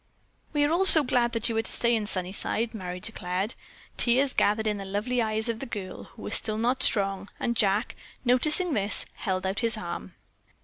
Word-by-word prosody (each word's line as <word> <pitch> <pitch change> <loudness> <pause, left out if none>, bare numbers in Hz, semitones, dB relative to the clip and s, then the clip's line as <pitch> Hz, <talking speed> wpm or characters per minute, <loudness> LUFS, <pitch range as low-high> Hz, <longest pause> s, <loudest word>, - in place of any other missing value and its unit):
"We 295 -1 +1
are 290 - +1
all 355 +4 +2
so 315 -5 +11
glad 245 -2 0
that 230 -2 +1
you 230 - -3
are - - +2
to - - -7
stay 235 0 0
in 215 -2 -3
Sunnyside," 200 +5 -2
Merry 180 -4 -6
declared. 190 0 -2 0.4
Tears 260 +3 +2
gathered 215 +2 +1
in 210 -1 -1
the 200 - -6
lovely 210 +6 -2
eyes 220 0 -2
of 230 -1 -3
the 270 - -7
girl, 195 -5 -7
who 225 - -15
was - - -5
still 215 -1 +3
not 245 +4 0
strong, 195 -1 0
and 235 - -2
Jack, 205 0 0 0.3
noticing 300 +8 +2
this, 205 -3 0
held 185 -1 -4
out 190 +1 -2
his 230 -2 -1
arm. 170 - -7
220 Hz, 205 wpm, -26 LUFS, 195-240 Hz, 0.4 s, so